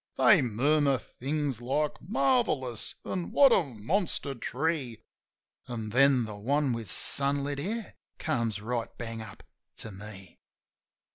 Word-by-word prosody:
They 205 -8 +6
murmur 140 +4 +2
things 135 0 -4
like 145 +5 -1
"Marvellous 160 - +1
!" - - -37
an' 180 -2 -3
"What 275 -2 +6
a 190 - +5
monster 140 - -2
tree!" 130 -1 -3 0.6
An' 115 -3 -5
then 130 +1 +4
the 105 -1 -7
one 135 +5 0
with 115 -2 -5
sunlit 140 0 +2
hair 215 +7 -4 0.2
comes 115 -9 -1
right 115 +2 -3
bang 115 -1 -5
up 110 - -11 0.3
to 115 - -8
me. 95 -2 -11
135 Hz, 130 wpm, -29 LUFS, 115-150 Hz, 0.6 s, They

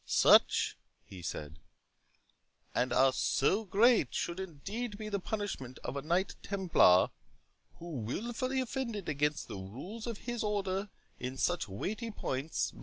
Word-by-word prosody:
"Such," - - +5 0.3
he 95 -2 -10
said, 80 -1 -5 1.1
"and 125 - +1 0.2
so 195 +14 +2
great 225 +5 +4
should 170 +1 -2
indeed 200 +6 -5
be 215 0 -5
the 200 -1 -1
punishment 190 - -4
of 125 - -4
a 140 - -2
Knight 175 +6 0
Templar, 180 - +4 0.6
who 170 -3 -7
wilfully 240 - -2
offended 235 -6 -3
against 150 0 0
the - - -6
rules 145 - -7
of 230 -3 -3
his 240 -1 -2
Order 200 -1 -1 0.3
in 130 +1 -4
such 175 -7 +1
weighty 210 - -4
points. 145 -7 -2
190 Hz, 130 wpm, -32 LUFS, 135-220 Hz, 1.1 s, Such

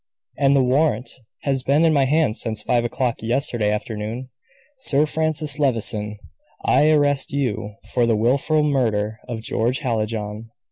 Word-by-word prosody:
And 140 0 +3
the 135 - +4
warrant 135 +1 +1 0.3
has 135 -2 0
been 145 +5 +2
in 160 - +4
my 140 -2 +3
hands 145 -4 +1
since 110 -2 -3
five 120 0 +1
o'clock 120 0 -2
yesterday 115 -2 0
afternoon. 110 +3 -4 0.5
Sir 150 - +3
Francis 155 -1 0
Levison, 110 -6 0 0.5
I 150 - +4
arrest 145 -3 +3
you 115 -7 -2 0.2
for 120 -2 +2
the 115 - +3
wilful 140 +7 +2
murder 110 -7 0
of 115 -3 -5
George 120 +3 0
Hallijohn." 110 -3 -3
125 Hz, 145 wpm, -22 LUFS, 110-145 Hz, 0.5 s, the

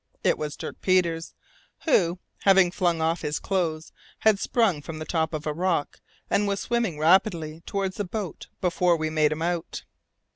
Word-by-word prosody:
It - - +3
was 150 -1 -4
Dirk - - -7
Peters, 170 -3 +1 0.5
who, 180 - +3 0.2
having 190 -2 +5
flung 175 -3 0
off 165 +1 0
his 150 -1 -2
clothes, 165 -5 -2 0.3
had 215 -2 +4
sprung 200 -12 +1
from 155 +2 -7
the 155 - -5
top 160 -2 0
of 155 -2 -4
a 150 - -1
rock, 170 -2 -1 0.3
and 205 0 +1
was 200 0 -1
swimming 235 -9 -1
rapidly 165 -1 +2
towards 195 -1 -2
the 205 - -1
boat 195 -2 -5
before 180 -1 +2
we 155 0 -2
made 155 -1 +3
him 155 +1 -2
out. 170 -1 -3
170 Hz, 175 wpm, -26 LUFS, 155-190 Hz, 0.5 s, having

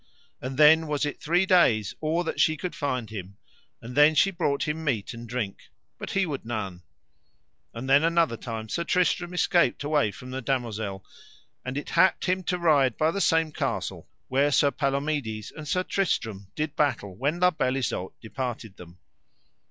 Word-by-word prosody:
And 130 +1 -5
then 155 +2 +6
was 150 -1 0
it 145 - -5
three 175 +4 +2
days 125 - +3
or 160 +3 0
that 165 - -4
she 155 0 +3
could 180 +4 -4
find 125 -6 -3
him, 100 -2 -8 0.5
and 120 +2 -8
then 150 +2 +6
she 195 +6 +4
brought 160 -7 -1
him 155 +1 -3
meat 125 -7 -1
and 115 0 -9
drink, 115 -5 -4 0.3
but - - -6
he 195 -1 +1
would 145 -5 -4
none; 100 -6 -4 0.9
and 115 +3 -7
then 140 +3 +5
another 165 -6 +2
time 115 -1 -6
Sir 170 - -2
Tristram 175 0 +1
escaped 175 -6 +2
away 145 -6 +2
from 125 +6 -10
the 130 +1 -4
damosel, 110 -7 -3 0.6
and 125 +2 -4
it 145 - -5
happed 185 +3 +3
him 185 0 +1
to 180 - 0
ride 145 -8 +3
by 155 +1 +2
the 200 - -2
same 165 -3 +2
castle - - -3 0.2
where 140 +3 +2
Sir 140 +1 +4
Palomides 140 -7 -2
and 155 -1 -9
Sir 185 +5 0
Tristram 110 - -2
did 155 -1 -3
battle 120 -10 0
when 145 - -1
La 180 0 +5
Beale 135 -5 0
Isoud 115 -7 -2
departed 115 -3 -5
them. 85 0 -13
140 Hz, 180 wpm, -26 LUFS, 115-160 Hz, 0.9 s, then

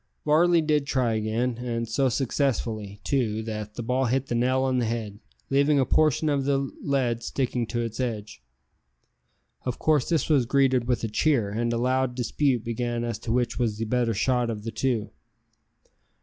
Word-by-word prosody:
Varley 165 +2 +4
did 150 -2 +1
try 125 -4 +1
again, 115 +3 -1
and 115 -1 -3
so 130 +4 +1
successfully, 115 -5 -1
too, 110 -5 0
that 105 -1 -5
the 120 - -4
ball 125 +3 +1
hit 130 +2 0
the 120 - -4
nail 130 +2 +2
on 130 -1 +1
the 120 - +1
head, 110 -3 -4 0.3
leaving 140 +1 +3
a 130 - +3
portion 155 +2 +2
of 140 -2 +1
the 140 0 +2 0.2
lead 125 -5 0
sticking 120 -1 -2
to 120 +1 -2
its 115 0 -5
edge. 110 - -4 1.2
Of 125 -2 -3
course 150 -5 +2
this 165 -5 +1
was 140 -7 +3
greeted 130 -3 +2
with 125 -2 0
a - - 0
cheer, 115 -2 +1
and 115 +3 -1
a 120 - 0
loud 130 +1 +1
dispute 125 0 0
began 120 0 -2
as 115 -3 -3
to 115 - -4
which 120 0 0
was 110 -4 0
the 115 - -2
better 115 -1 0
shot 125 +2 +1
of 105 -2 -4
the 115 - -4
two. 115 -2 -1
120 Hz, 185 wpm, -26 LUFS, 115-135 Hz, 1.2 s, Varley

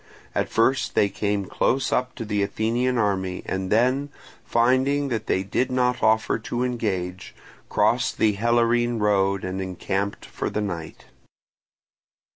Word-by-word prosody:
At - - -1
first 125 +4 +1
they 100 - +4
came 100 -1 -1
close 130 +7 0
up 125 +1 0
to 115 - -5
the 105 -1 -1
Athenian 115 +5 0
army, 95 -4 -1
and 95 0 -3
then, 130 +6 +2 0.3
finding 130 +4 +2
that 110 -3 -3
they 95 - +1
did 125 +6 -1
not 125 -1 +1
offer 110 +1 +2
to 120 +3 -3
engage, 95 -7 -3 0.3
crossed - - +1
the 110 -1 +3
Helorine 120 +2 +2
road 100 -2 +1
and 95 +1 -3
encamped 95 +2 -3
for - - -4
the - - -2
night. 85 -6 -5
110 Hz, 140 wpm, -24 LUFS, 100-125 Hz, 0.3 s, they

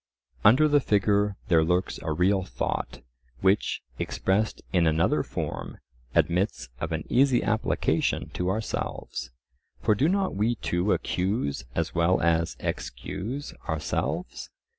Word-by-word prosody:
Under 130 +8 +7
the 145 -1 +4
figure 105 -3 +2
there 80 -2 +4
lurks 90 +3 0
a 80 - -3
real 95 +4 +2
thought, 65 -7 -3 0.4
which, 100 +2 +2 0.2
expressed 105 +3 0
in 85 -3 +4
another 80 +1 +2
form, - - -5 0.4
admits 90 - +1
of - - -3
an - - -2
easy 130 -1 +3
application 110 +1 0
to 90 0 -2
ourselves. 105 - -3 0.5
For 110 - +4
do 140 +10 +2
not 195 0 +1
we 110 +4 +1
too 90 -1 0
accuse 90 - -1
as 80 0 -1
well 85 +2 +3
as 85 +1 +1
excuse 130 +9 -4 0.2
ourselves? - - -2
95 Hz, 125 wpm, -27 LUFS, 85-110 Hz, 0.5 s, Under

